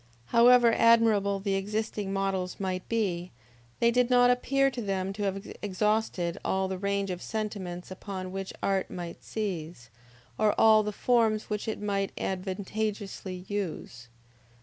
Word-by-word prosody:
However 240 0 +7
admirable 220 -4 +4
the 195 0 -1
existing 205 0 -2
models 195 -2 -2
might 185 -2 -3
be, 185 -6 -1 0.5
they 235 0 +4
did 245 0 +2
not 245 0 +6
appear 275 +2 +2
to 250 - -5
them 195 -2 -2
to 205 - -7
have 195 0 -3
exhausted 205 -3 0
all 190 0 0
the 190 -1 -4
range 200 0 -1
of 180 0 -5
sentiments 195 -5 -5
upon 185 -1 -6
which 195 0 -5
art 195 -1 +1
might 175 -2 -7
seize, 165 - -5 0.5
or 215 -1 +2
all 220 -1 +7
the 210 0 -2
forms 220 -1 +1
which 210 +1 -2
it 220 - -2
might 200 -1 -1
advantageously 195 0 -4
use. 170 - -5
200 Hz, 145 wpm, -28 LUFS, 185-220 Hz, 0.5 s, However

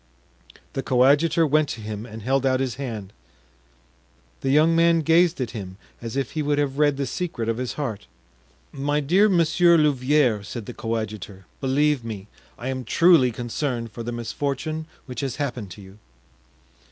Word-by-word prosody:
The 135 - -2
coadjutor 145 +7 +3
went 155 -1 +2
to 115 - -5
him 105 +1 -6
and 110 -1 -9
held 135 +2 +1
out 130 -1 +2
his 130 -3 -1
hand. 110 -7 -6 1.3
The 135 - -2
young 155 +4 +4
man 165 0 +4
gazed 165 +1 +3
at 125 -4 -2
him 95 -5 -7 0.2
as 115 +2 -5
if 135 - -2
he 155 - -2
would 145 0 0
have 145 -1 -1
read 145 -2 +3
the 140 - -1
secret 130 -4 -3
of 115 0 0
his 125 -1 -3
heart. 125 -9 -4 0.6
"My 145 +1 -1
dear 185 +9 +3
Monsieur 170 -1 +4
Louvieres," 135 -7 +2
said 115 0 -6
the 125 - -7
coadjutor, 110 -4 -5
"believe 140 0 +1
me, 105 -4 -6 0.3
I 125 - -5
am 130 -1 -3
truly 165 0 +5
concerned 120 0 -3
for 110 - -7
the 120 +1 -4
misfortune 145 +7 -3 0.2
which 125 -2 -7
has 135 -3 -2
happened 125 -8 -4
to 100 - -12
you." 95 +2 -15
135 Hz, 170 wpm, -24 LUFS, 115-150 Hz, 1.3 s, truly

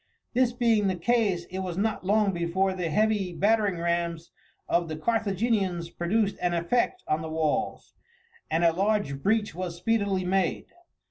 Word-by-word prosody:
This 250 0 +3
being 230 -4 +2
the 190 - 0
case 195 -2 +1
it 190 - -4
was 185 -2 -4
not 210 0 -1
long 205 +1 +2
before 175 +3 0
the 180 -3 -3
heavy 205 +1 +1
battering 205 0 +2
rams 170 -1 -2 0.4
of 170 0 +1
the 155 - -3
Carthaginians 195 -3 0
produced 200 +4 0
an 175 -1 +1
effect 240 - 0
on 155 +1 0
the 160 - -5
walls, 155 -1 -2 0.6
and 165 +2 +1
a 165 -1 +5
large 195 -7 0
breach 210 +1 +1
was 175 0 -4
speedily 200 -1 0
made. 185 -2 0
190 Hz, 155 wpm, -27 LUFS, 170-215 Hz, 0.6 s, a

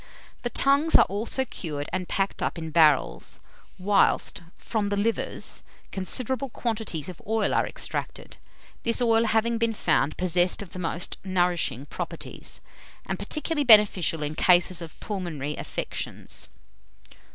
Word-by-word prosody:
The 240 - -2
tongues 280 +6 +3
are - - +8
also 225 +6 -2
cured 150 - -5
and 185 -1 -3
packed 195 0 -1
up - - -1
in 160 -1 -5
barrels; 155 -4 +2 0.4
whilst, 195 0 +2 0.2
from 210 -2 -2
the 205 - -1
livers, 225 +3 -1 0.3
considerable 255 +7 -2
quantities 220 - -3
of 180 -3 -9
oil 220 -1 +1
are - - +2
extracted, - - -3 0.4
this 230 +1 0
oil 230 -1 +3
having 225 +1 +1
been 230 -1 +1
found 150 -6 +1
possessed 180 +2 +1
of 190 - -14
the 185 - -6
most 170 0 -3
nourishing 175 -8 0
properties, - - -7 0.4
and - - -4
particularly 305 -1 -2
beneficial 205 - +5
in 150 +1 -3
cases 175 +1 +5
of 165 -2 -10
pulmonary 160 -8 -4
affections. - - -5
195 Hz, 135 wpm, -26 LUFS, 170-225 Hz, 0.4 s, are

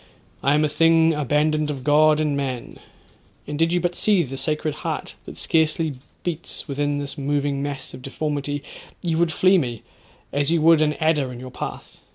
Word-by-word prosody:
I 140 +2 +3
am 150 +1 +3
a - - +2
thing 165 +1 +4
abandoned 150 +1 +1
of 135 -3 -4
God 150 +1 +5
and 150 -2 +1
man—and 140 +2 -7
did 165 +1 +3
you 175 - +2
but 175 0 -1
see 200 -1 +3
the 135 -2 -6
scared 150 +3 -1
heart - - -4
that - - -9
scarcely 160 -1 +1 0.3
beats 170 -1 -4
within 145 0 -1
this 145 0 -5
moving 140 0 0
mass 140 -1 -5
of - - -9
deformity, 145 +1 -3 0.4
you 165 -2 0
would 170 -1 +2
flee 185 +3 +4
me, 120 -7 -4 0.5
as 145 +1 +2
you 170 0 +3
would 165 -1 +6
an 150 -1 +3
adder 155 -5 +1
in 120 - -8
your 130 0 -8
path. - - -7
150 Hz, 185 wpm, -23 LUFS, 140-160 Hz, 0.5 s, would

